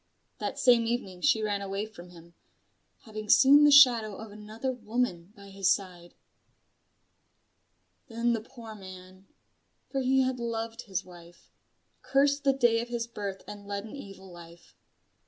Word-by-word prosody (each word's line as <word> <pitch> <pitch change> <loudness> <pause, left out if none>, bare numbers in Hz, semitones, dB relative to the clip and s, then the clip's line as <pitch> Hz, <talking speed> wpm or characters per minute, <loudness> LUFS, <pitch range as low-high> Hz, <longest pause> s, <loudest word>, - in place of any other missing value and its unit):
That - - -4
same 240 -3 +4
evening 195 -7 -4
she 230 -7 +2
ran 205 -1 -1
away 195 +1 -3
from 180 -5 -13
him: 170 -1 -16 0.7
having 215 -1 -9
seen 285 +5 +7
the - - +6
shadow 240 -7 +6
of 220 +1 -10
another 215 +5 -5
woman 220 -6 -3
by 200 0 -14
his 195 -1 0
side. 180 -3 -2 1.9
Then 235 -1 0
the 225 - -2
poor 225 0 -12
man 185 -1 -13 0.6
for 270 - -1
he 265 +1 +2
had 255 -1 -1
loved 230 0 -4
his 190 -3 -3
wife 175 -1 -16 0.5
cursed 280 +1 +1
the 275 - +5
day 240 -4 +2
of 240 - -8
his 235 -1 -3
birth 200 -4 -7
and 205 -1 -10
led 200 0 -4
an 225 - -10
evil 195 -7 -11
life. 170 0 -15
215 Hz, 155 wpm, -28 LUFS, 190-240 Hz, 1.9 s, seen